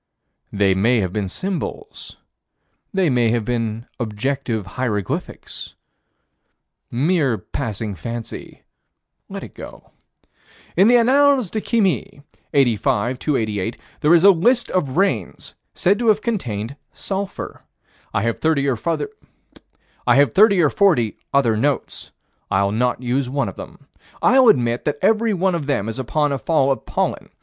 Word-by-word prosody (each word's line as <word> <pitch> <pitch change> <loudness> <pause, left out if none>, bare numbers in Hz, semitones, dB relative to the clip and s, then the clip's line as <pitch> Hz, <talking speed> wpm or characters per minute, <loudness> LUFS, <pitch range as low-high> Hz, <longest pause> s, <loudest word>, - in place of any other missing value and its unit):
They 100 -2 +2
may 115 +6 +2
have 95 -2 -3
been 105 -3 -2
symbols. 195 - -5 0.7
They 190 -3 +1
may 120 -5 +2
have 115 -1 0
been 115 -1 -2
objective 115 0 -2
hieroglyphics 105 -2 -4 1.1
Mere 140 -2 +1
passing 110 -5 -4
fancy 115 +6 -7 0.7
let - - -6
it - - -11
go - - -12 0.8
In 190 +4 +5
the 245 - +6
Annales 265 -2 +3
de 215 - -2
Chimie, 185 - -1 0.3
85 120 -2 +1
288, 110 -7 -1 0.2
there 160 +2 +5
is 170 - +4
a 200 - +9
list 235 +8 +2
of 150 -6 -1
rains 130 - -1 0.2
said 195 +3 +2
to 240 - -1
have 215 -1 +3
contained 125 - -3 0.2
sulphur. 195 0 -5 0.5
I 100 - 0
have 115 0 -1
thirty 155 -3 +1
or 135 - +1 2.0
forty 155 - +2 0.2
other 130 -5 +3
notes. 140 +6 -2 0.4
I'll 100 +1 +1
not 125 +3 0
use 125 +1 -1
one 140 +1 -1
of - - -10
them. 140 - -11 0.3
I'll 260 +2 +5
admit 120 - +3
that 150 -1 -1
every 220 +1 +3
one 185 +1 +1
of 155 -5 -3
them 125 -8 0
is 115 +3 -4
upon 145 +4 0
a 140 - -2
fall 140 -3 +2
of 135 - -3
pollen. - - -2
135 Hz, 135 wpm, -20 LUFS, 115-185 Hz, 2.0 s, a